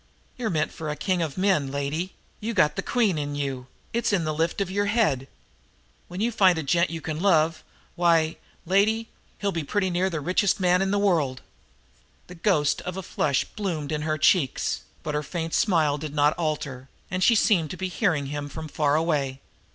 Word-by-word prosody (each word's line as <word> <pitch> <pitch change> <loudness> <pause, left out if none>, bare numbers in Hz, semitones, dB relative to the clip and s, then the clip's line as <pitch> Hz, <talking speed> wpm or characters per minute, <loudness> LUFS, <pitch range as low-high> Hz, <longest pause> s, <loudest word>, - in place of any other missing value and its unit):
"You're 240 -3 -2
meant 155 -4 0
for 160 -2 -6
a 150 - -2
king 180 +4 0
o' 160 -3 -1
men, 185 -8 +2
lady; 145 +6 -3 0.2
you 225 +1 -3
got 150 -6 +3
the - - -1
queen 215 -10 +1
in 145 0 -3
you 135 -3 -3 0.3
it's 235 -1 +1
in 190 -5 +1
the 155 -1 -1
lift 165 +4 -1
of 195 -2 -1
your 205 +1 0
head. 180 - +1 0.8
When 180 +1 -7
you 235 +2 +1
find 190 -6 +4
the 160 - -2
gent 170 +4 +2
you 165 -1 -5
can 155 -1 -4
love, 165 -4 +2 0.3
why, 165 -2 +3 0.3
lady, 215 +5 +2 0.3
he'll 200 -1 -1
be 165 -3 -2
pretty 190 +4 0
near 180 +2 +1
the 165 -4 -3
richest 180 +6 +1
man 180 0 +3
in 195 - +1
the 205 - +1
world!" 160 -11 +1 0.8
The 180 - -11
ghost 165 -5 +1
of 180 +1 -5
a 190 - -4
flush 140 -5 0
bloomed 170 -8 -4
in 150 -1 -1
her 155 0 -1
cheeks, 150 -3 +2 0.2
but 150 - -3
her 150 - 0
faint 165 +2 -4
smile 155 -7 +2
did 150 -1 -6
not 145 +1 +4
alter, 150 -5 -3 0.2
and 185 +1 0
she 235 - +5
seemed 195 -8 +3
to 180 - -6
be 190 - -2
hearing 180 -6 0
him 145 +1 -4
from 160 +2 -7
far 145 -1 +1
away. 145 -5 0
165 Hz, 205 wpm, -25 LUFS, 150-190 Hz, 0.8 s, she